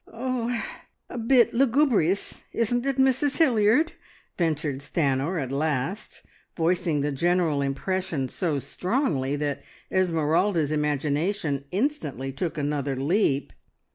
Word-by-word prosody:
"Er 245 -1 -2 0.5
a - - -5
bit 235 +1 +4
lugubrious, 235 - +2
isn't 240 +3 0
it, 275 -1 0
Mrs 265 +2 +3
Hilliard?" 255 +1 +4 0.4
ventured 155 -5 -1
Stanor 145 +3 0
at 135 -3 -4
last, 150 +6 -2 0.3
voicing 170 -2 +1
the 145 +1 0
general 165 0 +1
impression 145 +1 -2
so 155 +2 -1
strongly 150 - -1
that 145 -1 -2 0.3
Esmeralda's 165 -2 +1
imagination 150 +1 -1
instantly 180 - -2
took 155 +5 -3
another 145 -2 -1
leap. 140 - +1
165 Hz, 110 wpm, -25 LUFS, 145-225 Hz, 0.5 s, bit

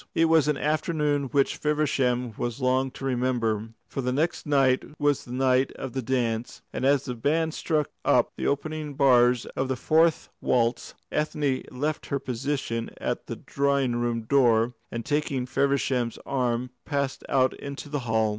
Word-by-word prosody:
It 165 - +4
was 160 -3 +4
an 150 -2 +1
afternoon 150 -1 0
which 140 +1 +1
Feversham 130 -5 0
was 120 +3 -3
long 130 0 +2
to 135 - -8
remember; 120 -4 0 0.2
for 135 - -4
the 125 0 -1
next 155 +5 -1
night 135 -3 +3 0.2
was 145 -2 +1
the 120 - -10
night 130 +1 +2
of 135 -2 -6
the 130 - -2
dance, 120 -2 -2
and - - -3
as 140 0 +3
the 125 - -3
band 155 +7 0
struck 155 -4 -1
up - - +3
the - - -2
opening 150 0 -2
bars 125 -3 +4
of 130 - 0
the 130 - -1
fourth 160 +4 +2
waltz, 120 -1 0 0.2
Ethne 150 -3 0
left 145 +4 -3
her 140 - 0
position 130 -2 -3
at - - -3
the - - -4
drawing 140 -3 0
room 120 -1 -1
door, 120 -2 +3 0.2
and 115 -1 -4
taking 145 -3 0
Feversham's 135 -3 0
arm 125 -2 -1
passed 140 -2 -2
out 130 -1 +3
into 140 +1 -7
the 145 0 -2
hall. 110 -3 +1
135 Hz, 165 wpm, -26 LUFS, 125-145 Hz, 0.2 s, It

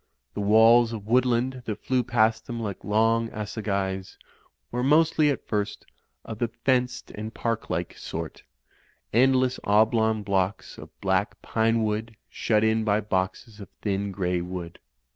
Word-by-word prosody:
The - - -3
walls 115 +3 +5
of 105 -3 -6
woodland 125 +2 +1
that 110 -3 -5
flew 130 -1 +1
past 115 -2 +1
them 120 -1 -4
like 105 -4 -5
long 115 +2 +2
assegais, 100 -3 -3 0.5
were 125 - -2
mostly, 155 +2 +4
at 140 - -3
first, 105 -2 -2 0.4
of 110 -1 -7
the 120 - +1
fenced 125 +2 -1
and 110 +1 -6
park 115 -1 -3
like - - -3
sort; 80 0 -6 0.7
end 130 +4 +5
less 130 0 +1
oblong 110 +1 +3
blocks 95 0 -1
of - - -10
black 95 +2 0
pinewood 110 0 0 0.2
shut 110 -1 +1
in 110 0 +2
by 105 -1 +2
boxes 105 +2 -3
of 100 -4 -10
thin 100 -1 -1
grey 90 -2 -1
wood. 90 -1 -7
110 Hz, 145 wpm, -26 LUFS, 100-120 Hz, 0.7 s, walls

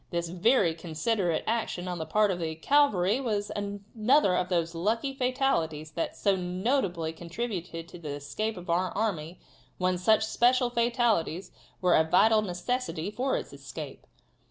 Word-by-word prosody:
This 170 -1 -2
very 185 0 +3
considerate 170 +2 -1
action 220 -5 -2
on 180 -1 -3
the 160 - -4
part 210 +4 +3
of 180 - -3
the 160 -1 -3
cavalry 215 - +3
was 210 -5 -2
another 205 +3 +1
of 180 0 0
those 170 -2 0
lucky 225 +10 -1
fatalities 250 - 0
that 165 - -3
so 200 -1 +2
notably 180 - -1
contributed 170 -1 -5
to 175 - -11
the 155 -3 -7
escape 200 +10 -3
of 180 +1 -9
our 180 +2 +1
army 180 -6 -2 0.4
when 180 -1 0
such 220 +4 +3
special 245 +2 +2
fatalities 235 -7 +1 0.3
were 180 - +4
a 160 - +5
vital 215 +7 +4
necessity 200 -1 -3
for 260 +5 0
its - - -7
escape. - - -9
185 Hz, 155 wpm, -28 LUFS, 170-230 Hz, 0.4 s, a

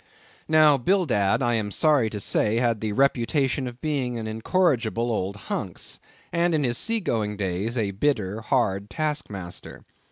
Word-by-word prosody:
Now, 155 -3 +5
Bildad, 130 - +2
I 120 -1 +2
am 110 -3 0
sorry 140 0 +3
to 105 - -5
say, 105 +2 +1
had 115 -2 +1
the 110 -1 -1
reputation 135 +2 +1
of 120 0 -9
being 135 -6 -1
an 115 - -4
incorrigible 115 -1 0
old 100 -2 -2
hunks, 105 - -5 0.3
and 170 -1 +2
in 150 - +1
his 120 -2 0
sea 230 0 +1
going 110 - -2
days, 100 +5 -2
a 105 -4 0
bitter, 105 -2 -1
hard 105 -5 0
task 155 -2 -2
master. 95 -4 -8
120 Hz, 160 wpm, -25 LUFS, 105-145 Hz, 0.3 s, Now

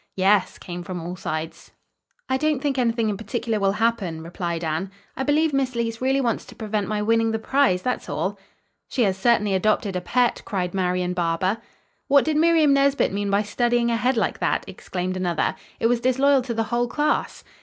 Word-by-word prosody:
"Yes," 195 +1 +2
came 175 0 -7
from 175 0 -5
all 175 +2 -5
sides. 155 -2 -5 0.5
"I 260 - +1
don't 305 +1 +1
think 275 -1 -1
anything 230 -2 +1
in 205 -2 -1
particular 225 +1 -2
will 195 -1 +2
happen," 205 -8 -1
replied 170 0 -4
Anne. 160 +4 -2 0.3
"I - - -4
believe 295 +2 +2
Miss 265 -2 0
Leece 230 0 -2
really 265 +1 +2
wants 240 -4 0
to - - -13
prevent 215 -2 -2
my 210 -1 -1
winning 225 +1 +2
the - - +1
prize. 220 -6 +2
That's 250 - -2
all." - - -2 0.5
"She 250 - 0
has 195 -3 +2
certainly 210 0 +2
adopted 200 0 +1
a 180 - -1
pet," 245 +7 +1
cried 180 -4 -3
Marian 180 -1 0
Barber. 180 +4 0 0.5
"What 280 -1 +5
did 310 -1 +1
Miriam 320 -2 +4
Nesbit 275 -5 +2
mean 200 0 -1
by 200 +1 +2
studying 240 +2 +1
ahead 245 +2 +1
like - - 0
that?" - - 0
exclaimed 185 0 -4
another. 175 -3 0 0.3
"It - - -1
was 235 0 +2
disloyal 270 +2 +3
to 245 -1 -4
the 225 - +1
whole 240 0 +2
class." 295 +4 -1
225 Hz, 195 wpm, -23 LUFS, 185-255 Hz, 0.5 s, What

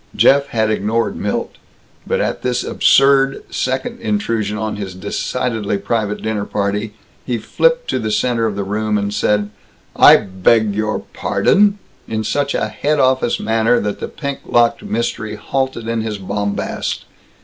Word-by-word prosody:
Jeff 140 0 +5
had 110 -4 0
ignored 110 +2 0
Milt. - - -3 0.5
But - - 0
at - - -2
this 125 -1 -1
absurd 135 0 +3
second 130 +1 -2
intrusion 105 0 -1
on 110 -1 -3
his 95 -3 -6
decidedly 105 +2 -2
private 105 0 -2
dinner 110 -2 -2
party 105 +1 -2 0.3
he 120 -2 -2
flipped - - +1
to - - 0
the 110 - -2
center 115 +1 +1
of 105 - -3
the 100 - -2
room 105 +2 -1
and 100 0 -2
said 105 0 +1 0.4
"I - - +8
beg 100 +3 +2
your 110 +1 -1
pardon!" 205 0 +2 0.3
in 110 -1 -2
such 140 +5 -1
a - - 0
head 150 +1 -1
office 130 -2 +2
manner 115 +2 +2
that 105 0 -3
the - - -4
pink 140 -2 -5
locked 120 -1 +3
Mystery 110 -1 -3
halted 130 -1 -3
in 115 -1 -1
his 110 -1 -3
bombast. 100 +1 -3
110 Hz, 155 wpm, -18 LUFS, 105-125 Hz, 0.5 s, I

